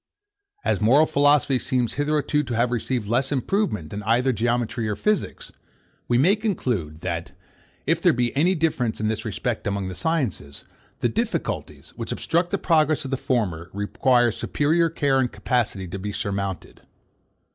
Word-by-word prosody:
As - - +1
moral 135 +9 +5
philosophy 145 -3 +3
seems 125 -2 0
hitherto 150 0 +1
to 125 -5 -4
have 120 +1 +1
received 120 -2 -2
less 130 +5 0
improvement 135 - -1
than 105 - -4
either 120 +5 +2
geometry 115 0 -1
or 105 - -1
physics, 210 - -1 0.6
we 120 - +3
may 175 +11 +5
conclude, 120 - -2
that, 85 -1 -4 0.5
if - - +1
there - - +5
be 120 0 -1
any 175 +7 +3
difference 150 -9 0
in 110 0 0
this 110 - -3
respect - - -3
among 100 -2 -2
these 90 -1 -7
sciences, 120 - -2 0.4
the - - +3
difficulties, - - -3
which - - -5
obstruct 170 +2 0
the 200 - 0
progress 155 -4 +2
of 135 - -5
the - - +2
former, 95 -11 -1
require 120 +4 +2
superior 160 +8 +1
care 140 -4 +1
and 125 -2 +1
capacity 105 -7 -1
to 95 +3 -6
be 105 +2 -4
surmounted. 100 -2 -4
125 Hz, 160 wpm, -24 LUFS, 105-150 Hz, 0.6 s, moral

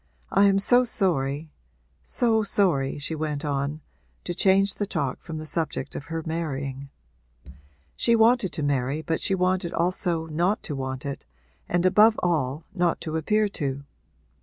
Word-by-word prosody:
I 200 - +5
am 195 -1 +4
so 245 +5 +5
sorry 155 - 0 0.5
so 220 - +1
sorry,' 175 -11 +1
she 145 +3 -3
went 150 -1 -3
on, 145 +1 -2 0.4
to 175 - -3
change 195 +2 +4
the 205 - -3
talk 145 -9 -2
from 160 -2 -7
the 155 - -6
subject 160 +1 -3
of 145 - -6
her 165 -1 -4
marrying. 140 -4 -4 1.1
She 235 - +3
wanted 225 -4 +4
to 155 - -1
marry 140 +2 -1
but 160 +1 -2
she 195 - +2
wanted 185 -1 0
also 170 -1 0
not 175 +6 0
to 145 - -4
want 130 0 -4
it 140 -1 -6 0.4
and, 175 +1 +1
above 215 +4 +5
all, 155 -4 0
not 175 -3 +1
to 160 -1 -4
appear 210 +7 +1
to. 140 -7 -3
165 Hz, 160 wpm, -25 LUFS, 145-195 Hz, 1.1 s, I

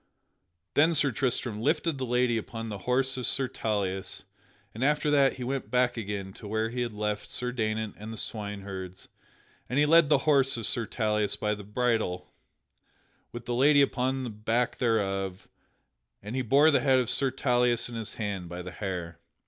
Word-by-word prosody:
Then 160 +3 +4
Sir 145 -2 +3
Tristram 120 -3 -1
lifted 150 +4 0
the 130 - -2
lady 125 0 +2
upon 115 0 -5
the 100 -2 -5
horse 130 +1 +2
of 125 - +1
Sir 135 -1 +3
Tauleas, 100 -4 -2 0.5
and 115 - -4
after 150 +1 +2
that 140 -2 +4
he 125 - -7
went 135 +2 -3
back 125 -1 +2
again 100 -3 -5
to 105 - -10
where 110 +2 -1
he 125 +1 -3
had 120 -1 -2
left 105 0 -3
Sir 125 0 -2
Daynant 110 -2 -2
and 110 +2 -7
the 115 - -7
swineherds; 100 -4 -6 0.6
and 125 - -1
he 145 - +5
led 165 0 +5
the 150 - +6
horse 135 -4 +4
of 115 - -4
Sir 115 +1 -1
Tauleas 105 -3 0
by 105 0 -1
the 105 -1 -7
bridle 110 -4 -1 1.0
with 120 0 -8
the 120 - -2
lady 140 +3 +5
upon 130 0 -1
the 120 - -4
back 115 +3 -1
thereof 95 -5 -1 0.8
and 105 +4 -6
he 130 - 0
bore 140 +6 +5
the 140 - +4
head 135 -2 +3
of 125 -2 +1
Sir 135 +3 +1
Tauleas 125 -2 +1
in 120 - -10
his 110 -2 -5
hand 100 -5 -4
by 90 +1 -6
the 90 - -7
hair. 90 -4 -5
115 Hz, 190 wpm, -28 LUFS, 105-130 Hz, 1.0 s, the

